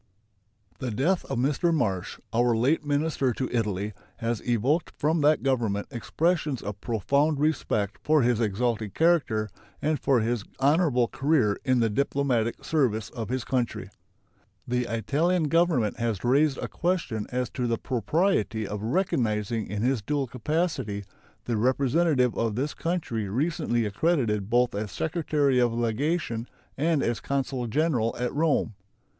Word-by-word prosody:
The 130 - -3
death 145 - 0
of - - -3
Mr. 145 +7 +1
Marsh, 100 - -1
our 120 0 +3
late 140 +7 +2
minister 145 -3 0
to 130 +3 -2
Italy, 105 -2 -1 0.2
has 115 -1 -2
evoked 125 +8 0
from 155 +2 +1
that 150 +1 +3
Government 115 -7 0
expressions 150 +3 -1
of 105 -1 -6
profound 140 +7 +1
respect 115 -9 0
for 155 -3 +4
his 120 -1 +2
exalted 110 -1 -1
character 155 -11 +2 0.3
and 155 0 0
for 130 -4 +2
his 115 -1 -1 0.2
honorable 140 -3 +3
career 135 -8 +1
in 130 -2 +2
the 115 - +2
diplomatic 130 -2 0
service 115 -9 0
of 115 -3 -5
his 130 -1 -1
country. 125 -2 -2 0.8
The 125 0 0
Italian 150 +9 0
Government 165 - +2
has 115 -5 -1
raised 135 +3 +3
a - - -3
question 165 - -2
as 125 0 -2
to 125 -2 -2
the 115 -1 0
propriety 125 - 0
of 105 -1 -5
recognizing 115 - 0
in 105 +3 -3
his 125 -2 +1
dual 140 +6 -1
capacity 130 - -2 0.4
the 120 -2 -1
representative 130 +2 +2
of 115 -2 -1
this 140 +5 -1
country 140 - -2
recently 130 - 0
accredited 105 - 0
both 120 +1 +3
as 105 -1 -3
secretary 150 - +1
of 120 -1 +3
legation 120 +1 -1 0.3
and 155 +1 +1
as 120 0 0
consul 135 -3 -2
general 125 -3 +1
at 125 0 -2
Rome. 150 -7 +1
125 Hz, 145 wpm, -26 LUFS, 115-150 Hz, 0.8 s, for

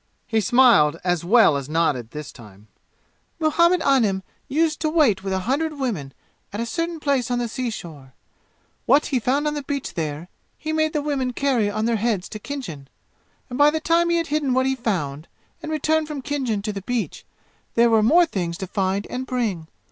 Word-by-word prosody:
He 225 -2 +1
smiled 215 - +5
as 175 -2 0
well 205 -4 +5
as 140 0 -4
nodded 150 -8 0
this 150 +2 -7
time. 105 -2 -15 0.7
"Muhammad 340 +2 +3
Anim 215 -9 +2 0.2
used 310 +3 +1
to 310 - 0
wait 275 - +3
with 195 - -3
a 190 0 0
hundred 300 +5 -1
women 195 - -3 0.4
at 205 - -5
a 230 - -1
certain 330 +7 -3
place 275 -5 0
on 245 - 0
the 240 -1 -1
seashore. 170 - -6 0.7
What 290 +2 +5
he 260 - 0
found 270 +6 0
on 300 - 0
the 295 - -3
beach 280 -1 -4
there 155 0 -4 0.3
he 315 +1 -4
made 315 0 +1
the 300 - -1
women 270 -4 -1
carry 245 -6 +1
on 215 +2 -2
their 230 -1 +1
heads 210 -4 -1
to 215 - -7
Khinjan. 205 - -7 0.6
And 250 +1 -6
by 290 +1 +7
the 315 +1 -1
time 335 +2 +2
he 340 - +2
had 335 - 0
hidden 285 -4 +1
what 260 0 +2
he 265 0 +1
found 165 - -3 0.3
and 310 - -5
returned 310 0 +1
from 295 -3 -6
Khinjan 255 -8 -2
to 210 0 -3
the 200 - -5
beach, 240 +3 -3 0.5
there 235 0 +4
were 220 -1 +5
more 330 +11 +5
things 175 - -3
to 190 - -4
find 195 +1 -1
and 255 +1 -5
bring. 215 -11 -2
240 Hz, 200 wpm, -23 LUFS, 190-290 Hz, 0.7 s, by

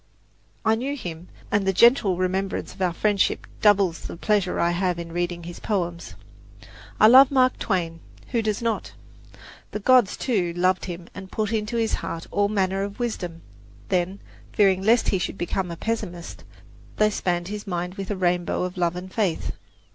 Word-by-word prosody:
I 220 - +4
knew 260 +6 -2
him, 175 - -7 0.2
and 205 -1 +2
the - - +4
gentle 220 -3 +5
remembrance 190 +1 -2
of 190 - -12
our 180 -1 +2
friendship 200 +3 +1 0.2
doubles 200 -5 +4
the - - -7
pleasure 200 -1 +1
I 170 - +2
have 180 0 0
in 170 -1 -6
reading 175 0 -2
his 175 +1 -8
poems. 175 -5 -3 0.8
I - - +7
love 260 +4 +9
Mark 255 -2 +3
Twain 170 -5 -1 0.3
who 235 -2 +1
does 215 0 -2
not? 230 -1 -2 0.8
The 210 - -4
gods, 245 -1 +4
too, 190 -9 0
loved 185 +2 +1
him 175 -1 -7
and 190 -1 -9
put 215 0 -1
into 220 +1 -1
his 225 -1 0
heart 165 0 -4
all 205 0 +2
manner 195 -2 0
of 200 0 -4
wisdom; 180 -8 -4 0.5
then, 185 +2 0 0.3
fearing 195 -2 +4
lest 225 +4 +3
he 190 - +2
should 185 - -3
become 180 +1 -2
a 170 - -6
pessimist, 175 -6 -4 0.5
they 215 0 +3
spanned 175 -2 -1
his 210 0 -6
mind 180 -1 -3
with 195 -1 -6
a 205 - -1
rainbow 180 -1 0
of 180 0 -4
love 175 -1 +1
and 185 +1 -8
faith. 195 -7 0
190 Hz, 175 wpm, -24 LUFS, 175-215 Hz, 0.8 s, love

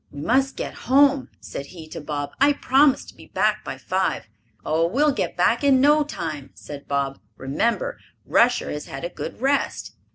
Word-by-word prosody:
"We 145 - -10
must 265 - +1
get - - -5 0.2
home," 280 0 +4
said 140 - -7
he 165 -3 -11
to 155 - -7
Bob. 145 -1 -4
"I 290 +1 +6
promised 275 0 +3
to - - -14
be - - -15
back - - 0
by - - -6
five." 190 0 -1 0.4
"Oh, 160 +2 +2
we'll 290 - +2
get 275 - -3
back - - +2
in 275 -2 +5
no 295 +3 +5
time," 155 - -6
said 145 -1 -10
Bob. 140 -1 -1 0.2
"Remember, 235 - -1 0.3
Rusher 245 +1 +2
has 150 - -5
had 135 +4 -6
a - - -3
good 180 - -7
rest." 275 +3 -1
235 Hz, 185 wpm, -23 LUFS, -, 0.4 s, I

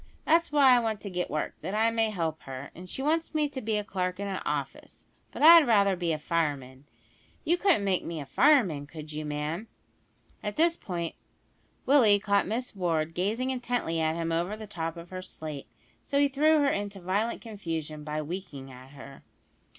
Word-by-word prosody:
That's 335 0 +3
why 275 -4 +6
I - - +4
want 220 -3 -2
to 200 - -7
get 180 0 -2
work, 155 - -2
that 195 - -4
I 225 +1 +3
may 225 -1 +1
help 165 -6 -3
her; 135 +1 -8
and 180 +2 -11
she 265 - -4
wants 320 +2 0
me 305 -1 +2
to 265 -2 -6
be 220 -2 -1
a 210 - -1
clerk 185 -2 -3
in 200 - -3
a 195 -1 -3
office, - - -5 0.3
but - - -4
I'd 330 -2 +9
rather 200 -4 +4
be 175 -2 -1
a 155 - 0
fireman. 145 -5 -2 0.6
You 340 - +3
couldn't 355 - +2
make 190 -2 +1
me 165 -1 -5
a 145 - -6
fireman, 195 - +3
could 155 0 -9
you, 155 0 -4
ma'am?" 150 +7 -3 0.7
At 210 -1 -4
this 335 +1 +3
point 170 - -4 0.7
Willie 245 -7 +6
caught 200 -1 +1
Miss 235 +3 -3
Ward 165 -4 -1
gazing 220 +9 -1
intently 245 -10 -2
at 160 0 +1
him 165 0 -2
over 175 +6 -1
the 215 - -8
top 165 -5 -5
of 170 +1 -11
her 185 0 -5
slate, 155 -5 -8 0.3
so 280 - -2
he 285 0 +5
threw 305 +3 +3
her 280 - +3
into 200 -3 -3
violent 200 +6 -1
confusion 165 -9 -5
by 155 0 -3
winking 150 -5 -7
at 130 +2 -13
her. 135 0 -12
190 Hz, 200 wpm, -28 LUFS, 160-230 Hz, 0.7 s, I'd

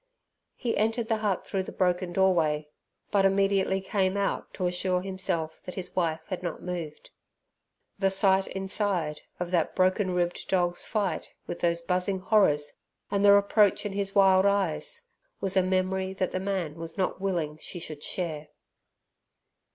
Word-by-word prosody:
He 235 - -2
entered 225 +2 0
the 225 - +2
hut 210 -3 -1
through 195 - -1
the 185 - -7
broken 180 -1 0
doorway, 165 -5 +2 0.4
but 200 -1 +3
immediately 195 0 +2
came 190 0 0
out 200 - -1
to 185 - -2
assure 180 +1 0
himself 185 -4 -2
that 180 - -7
his 180 -1 -6
wife 165 -3 0
had 185 -3 -4
not 175 -3 -5
moved. 170 -4 -6 0.9
The 195 -1 +3
sight 190 0 +3
inside 190 -5 -1 0.2
of 175 0 -3
that 170 -3 +1
broken 185 0 +2
ribbed 175 0 -1
dog's 175 -2 +1
fight 205 -4 -2 0.2
with - - -5
those 170 0 0
buzzing 180 +2 0
horrors, 165 -8 +2 0.3
and 200 0 +1
the 200 - +8
reproach 200 +1 +4
in 205 - -3
his 200 0 -2
wild 190 -1 +6
eyes, 200 - -1 0.3
was 195 -1 -1
a 190 - +5
memory 190 +1 0
that 185 -1 -1
the 185 - -2
man 185 -5 -2
was 165 0 -6
not 190 0 -1
willing 165 -6 -1
she 180 - -7
should 155 -3 -7
share. 155 -4 -3
185 Hz, 160 wpm, -28 LUFS, 175-195 Hz, 0.9 s, the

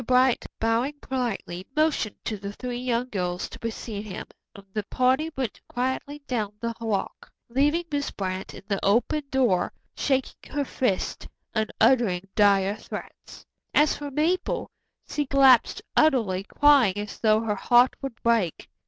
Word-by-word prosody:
Bright, 255 0 +3
bowing 230 +6 +1
politely, 230 -9 -3
motioned 305 -9 +1
to 220 - -1
the 200 0 -6
three 245 +2 -5
young 250 0 -1
girls 180 -4 -2
to - - -11
precede 225 -2 -5
him, 185 - -6 0.3
and 200 -1 -12
the 215 - 0
party 260 +8 +2
went 255 -6 -3
quietly 260 +3 -3
down 215 -6 -2
the 230 0 -2
walk, 215 -4 -3 0.2
leaving 290 +7 +2
Miss 285 -1 -1
Brant 190 -1 -4
in - - -11
the 200 -2 -2
open 245 +8 +2
door, 245 -10 +2 0.2
shaking 265 -1 -2
her 285 0 0
fist 250 -7 -1 0.3
and 220 -1 0
uttering 195 -8 +3
dire 200 -1 +3
threats. - - -9 0.3
As 300 +1 +4
for 290 0 -6
Mabel, 320 +6 0 0.4
she 295 -2 -2
collapsed 265 -3 +5
utterly, 225 -11 +3
crying 270 -7 +4
as 205 0 -5
though 215 -1 +4
her 225 -2 0
heart 245 +5 +4
would 270 -4 -5
break. 225 -8 +1
235 Hz, 150 wpm, -26 LUFS, 205-270 Hz, 0.4 s, collapsed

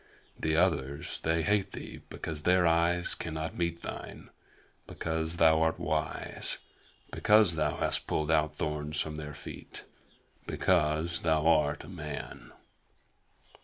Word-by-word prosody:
The 80 0 +1
others 70 -5 0
they 80 0 +1
hate 100 +2 +1
thee - - -8
because 80 -2 -5
their 90 +2 +4
eyes 85 +1 +3
cannot 80 -1 -4
meet 85 -1 -2
thine; - - -8 0.6
because 80 0 -3
thou 80 -1 +5
art 80 0 +2
wise; 75 +1 -1 0.5
because 105 -5 +5
thou 75 -2 0
hast - - +1
pulled 75 0 0
out 75 -1 +2
thorns 75 -1 -3
from 80 - -1
their 75 -1 -6
feet - - -8 0.6
because 85 -1 +1
thou 80 -2 +2
art 75 -3 +3
a - - -11
man." 75 -8 -7
80 Hz, 130 wpm, -30 LUFS, 75-85 Hz, 0.6 s, thou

